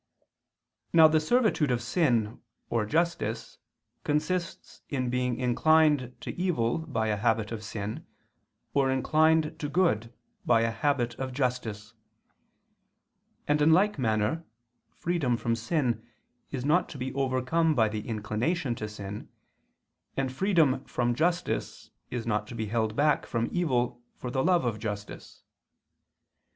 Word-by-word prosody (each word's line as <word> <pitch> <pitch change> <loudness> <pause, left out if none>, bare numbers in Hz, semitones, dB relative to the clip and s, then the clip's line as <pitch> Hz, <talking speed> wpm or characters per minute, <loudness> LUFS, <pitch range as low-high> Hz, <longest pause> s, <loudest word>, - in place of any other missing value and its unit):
Now 160 -2 +9
the 155 0 +3
servitude 210 - +2
of 125 -1 +1
sin 120 - 0 0.3
or 110 -3 0
justice 170 +8 -1 0.4
consists 170 +4 -2
in 130 -3 -1
being 125 -1 -1
inclined 145 0 +3
to - - -5
evil 165 -10 0
by 120 -9 -2
a 105 - +1
habit 110 +1 0
of 110 -2 -5
sin, 105 0 -5 0.7
or 135 -1 +3
inclined 155 +4 +2
to 145 - -3
good 140 - +1 0.3
by 115 -2 +4
a 115 0 +1
habit 125 -2 0
of 130 -1 -3
justice: 120 -5 -2 1.5
and 150 0 +2
in 160 +2 +6
like 200 0 +3
manner 110 +6 0 0.5
freedom 155 -9 0
from 115 0 -1
sin 120 -1 -1 0.5
is 130 -2 -4
not 170 +5 +2
to 145 - -8
be 130 0 -4
overcome 135 +4 +1
by 110 -3 +4
the 105 0 -5
inclination 115 - -1
to 110 -2 -5
sin, 105 0 -7 0.9
and 135 -1 0
freedom 165 -5 +2
from 120 0 0
justice 170 +7 -1 0.2
is 120 -2 -4
not 105 -2 -1
to 120 - -8
be 110 -1 -2
held 110 0 -1
back 150 +2 +2
from 115 0 -1
evil 125 -8 0
for 125 - -6
the 130 +1 0
love 175 -6 +3
of 110 -3 -1
justice. 105 -2 -7
125 Hz, 140 wpm, -28 LUFS, 115-155 Hz, 1.5 s, Now